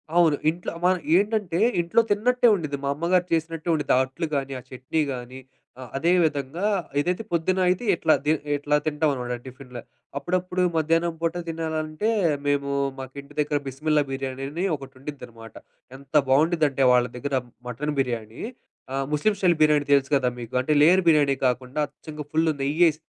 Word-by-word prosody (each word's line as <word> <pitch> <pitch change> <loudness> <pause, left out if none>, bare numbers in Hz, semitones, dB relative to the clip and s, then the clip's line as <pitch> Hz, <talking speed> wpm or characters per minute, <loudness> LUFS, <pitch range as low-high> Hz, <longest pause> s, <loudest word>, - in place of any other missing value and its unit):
అవును. 165 -4 +4
ఇంట్లో 170 +3 -4
మన 185 0 +4 0.2
ఏంటంటే 205 -4 0 0.2
ఇంట్లో 170 +7 +3
తిన్నట్టే 245 +4 +3
ఉండుద్ది. 150 -6 -3
మా - - 0
అమ్మగారు 175 +3 +1
చేసినట్టే 165 0 -2
ఉండుద్ది. 150 -3 +1
ఆ - - +5
అట్లు 150 +6 -5
గానీ, 135 -1 -2
ఆ - - -11
చట్నీ 130 +5 -2
గానీ 125 +1 -8 0.4
ఆహ్, 130 - -8
అదే 170 +5 +2
విధంగా 150 +4 -1 0.3
ఇదైతే 180 +8 -1
పొద్దున్న 175 +2 0
అయితే 185 +6 0
ఇట్లా 160 -2 +3
ది 150 - +3 0.2
ఇట్లా 145 +1 0
తింటామనమాట 145 -5 -1
టిఫిన్‌లు. 130 -1 -10 0.4
అప్పుడప్పుడు 180 +3 -1
మధ్యాహ్నం 165 +2 +1
పూట 165 0 0
తినాలంటే, 160 +3 -2 0.4
మేము 140 -1 +1 0.3
మాకింటి 140 +2 -9
దగ్గర 150 0 +1
బిస్మిల్లా 150 +3 +1
బిర్యానీ 135 0 -4
అని 170 +6 -2
ఒకటి 135 -1 -11
ఉండిద్దనమాట. 115 -6 -10 0.4
ఎంత 140 +2 -19
బావుండిద్దంటే 145 -1 +3
వాళ్ళ 125 -1 +4
దగ్గర 140 +3 -4 0.3
మటన్ 145 +5 -3
బిర్యానీ 115 -4 -3 0.5
ఆహ్, 135 0 -1
ముస్లిం 180 +9 +2
స్టైల్ 175 -4 +3
బిర్యానీ 150 -1 +3
తెలుసు 140 -1 +3
గదా! 130 -2 +2
మీకు 115 -2 -8
అంటే 150 +4 +1
లేయర్ 180 +5 +6
బిర్యానీ 145 -4 +4
కాకుండా 125 +3 -2
అచ్చంగా 150 +1 -9
ఫుల్లు 160 0 +2
నెయ్యేసి 155 +3 +3
150 Hz, 155 wpm, -24 LUFS, 135-170 Hz, 0.5 s, లేయర్